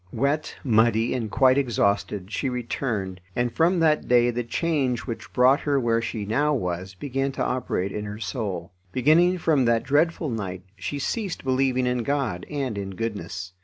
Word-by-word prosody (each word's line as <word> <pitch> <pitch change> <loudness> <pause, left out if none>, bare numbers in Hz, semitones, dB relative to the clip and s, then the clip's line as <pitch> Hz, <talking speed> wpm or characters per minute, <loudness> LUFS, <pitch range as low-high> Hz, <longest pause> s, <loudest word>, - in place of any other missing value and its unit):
Wet, 140 +6 -1
muddy, 115 -2 +3
and 120 -4 -2
quite 130 +5 +4
exhausted, 100 -5 0
she 135 - -1
returned, 110 -6 -3
and 120 0 0
from 170 +3 +3
that 155 -2 +3
day 120 0 +4
the 120 +1 -2
change 130 -2 0
which 115 -3 -7
brought 130 +2 +5
her 145 -2 +1
where 115 -2 +1
she 110 -2 -4
now 145 +8 +1
was 90 -3 -3
began 135 +5 -2
to - - -2
operate 105 -6 -1
in 105 0 -4
her 105 0 -6
soul. 100 - -4 0.2
Beginning 160 - +4
from 155 -6 +2
that 115 -1 +2
dreadful 155 0 +1
night, 95 -5 -4
she 105 +8 -4
ceased 195 - -3
believing 130 -1 +1
in 125 -1 0
God 130 -9 -2
and 135 -8 -2
in 95 -1 -5
goodness. 95 -4 -4
120 Hz, 170 wpm, -25 LUFS, 105-140 Hz, 0.2 s, brought